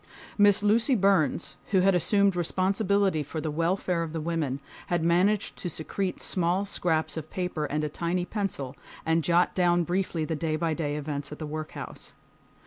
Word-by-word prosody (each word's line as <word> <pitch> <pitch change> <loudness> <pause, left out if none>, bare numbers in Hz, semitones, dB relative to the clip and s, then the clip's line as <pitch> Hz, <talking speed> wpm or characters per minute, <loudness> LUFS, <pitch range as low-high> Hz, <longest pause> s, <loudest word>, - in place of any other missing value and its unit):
Miss 205 0 +5
Lucy 230 +5 +3
Burns, 190 - +2
who 190 -3 +3
had 195 +1 +4
assumed 195 +2 +3
responsibility 190 0 +1
for 150 +2 -5
the 155 0 -3
welfare 170 +2 0
of 165 -1 -4
the 165 - -2
women, 155 -4 -2 0.3
had 175 -2 0
managed 185 +5 +2
to 175 - -3
secrete 180 +4 -3
small 180 +2 +1
scraps 165 -5 0
of 155 -1 -6
paper 180 -4 -2
and 150 +1 -2
a - - 0
tiny 170 +4 -2
pencil, 180 - -3 0.3
and 160 0 +2
jot 175 +2 +3
down 175 -1 +3
briefly 175 -2 -1
the 160 - -2
day 155 0 -1
by 165 0 0
day 150 -2 -2
events 145 -1 -4
at 150 - -7
the 155 - -5
workhouse. 155 +1 -7
170 Hz, 175 wpm, -27 LUFS, 155-190 Hz, 0.3 s, Miss